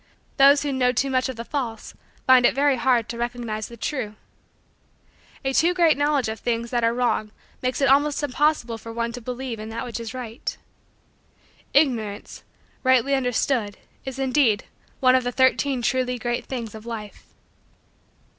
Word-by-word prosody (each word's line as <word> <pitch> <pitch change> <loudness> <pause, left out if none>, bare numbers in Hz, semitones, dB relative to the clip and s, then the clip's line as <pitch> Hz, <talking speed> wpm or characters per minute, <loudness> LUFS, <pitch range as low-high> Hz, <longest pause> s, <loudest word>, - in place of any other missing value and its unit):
Those 280 +1 +6
who 290 - -1
know 250 -1 +2
too 270 +2 0
much 255 0 +1
of 260 - -5
the 230 +1 -7
false 240 -6 -4 0.3
find 255 -1 +6
it 240 - +4
very 280 -1 +3
hard 240 -2 +2
to 235 - -6
recognize 235 -3 -3
the 235 - -12
true. 225 -4 -3 1.3
A 270 - 0
too 345 +6 +3
great 335 -4 +4
knowledge 290 -3 +1
of 220 0 -4
things 235 -1 -2
that 240 -2 0
are 230 - +4
wrong 235 -3 0 0.3
makes 255 +2 -1
it 275 - +4
almost 285 +2 +3
impossible 280 -4 0
for 230 - -9
one 235 0 -2
to 245 +1 -8
believe 250 -1 -5
in 215 +1 -7
that 230 +1 -4
which 235 -2 -5
is 230 -1 -6
right. 245 -1 -5 1.2
Ignorance, 230 -8 0 0.4
rightly 260 +1 +3
understood, 245 -4 0 0.3
is, 265 -1 -6
indeed, 260 -5 +2 0.4
one 255 -1 +5
of 255 -1 +3
the 245 - -2
Thirteen 260 0 +2
Truly 250 0 0
Great 240 +1 -2
Things 235 -5 -5
of 220 +1 -10
Life. 215 -3 -7
250 Hz, 170 wpm, -24 LUFS, 230-270 Hz, 1.3 s, Those